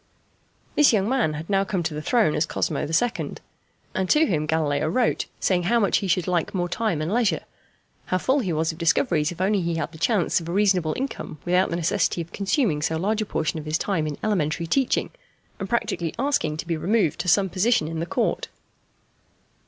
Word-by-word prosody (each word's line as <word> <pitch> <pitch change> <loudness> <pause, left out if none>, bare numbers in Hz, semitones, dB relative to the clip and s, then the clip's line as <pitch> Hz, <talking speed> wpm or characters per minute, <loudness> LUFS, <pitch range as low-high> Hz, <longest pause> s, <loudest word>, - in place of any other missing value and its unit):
This 295 - +5
young 200 -2 +2
man 245 -11 +1
had 155 +2 -6
now 195 -1 +2
come 190 -3 -2
to 160 - -2
the 150 - -4
throne 215 -3 +2
as 155 +1 0
Cosmo - - -1
II., 230 +9 0 0.6
and 190 -1 -1
to 310 +1 +5
him 155 - -1
Galileo 155 -1 +1
wrote 235 +9 +1
saying 180 -2 +2
how 235 0 +4
much 205 - +2
he 200 - -3
should 180 -1 +1
like 175 +1 0
more 175 -1 0
time 175 -5 -1
and 170 +6 -2
leisure, 230 -3 +2 0.7
how 185 - +1
full 260 +9 +1
he 195 -9 -1
was 160 +1 0
of 160 - -12
discoveries 165 - +2
if 175 - -9
he 185 - -1
only 190 -4 +1
had 165 +1 -3
the 160 - -13
chance 200 -3 +2
of 165 - -7
a - - -2
reasonable 185 -5 +2
income 265 - -5
without 180 +2 +2
the - - -2
necessity 170 +1 0
of 170 0 -6
consuming 200 - 0
so 160 +1 0
large 210 +6 0
a 215 - -3
portion 160 -3 -1
of 155 - -8
his 155 +1 0
time 165 -6 -1
in 150 - -4
elementary 170 -6 0
teaching, 260 +10 +1 0.5
and 195 - -4
practically 170 -8 -1
asking 240 - 0
to 160 - -5
be 170 -1 -1
removed 180 0 +1
to 180 - -3
some 195 +3 +4
position 185 -2 +1
in 165 0 -4
the 165 - -3
Court. - - -1
175 Hz, 215 wpm, -24 LUFS, 160-210 Hz, 0.7 s, This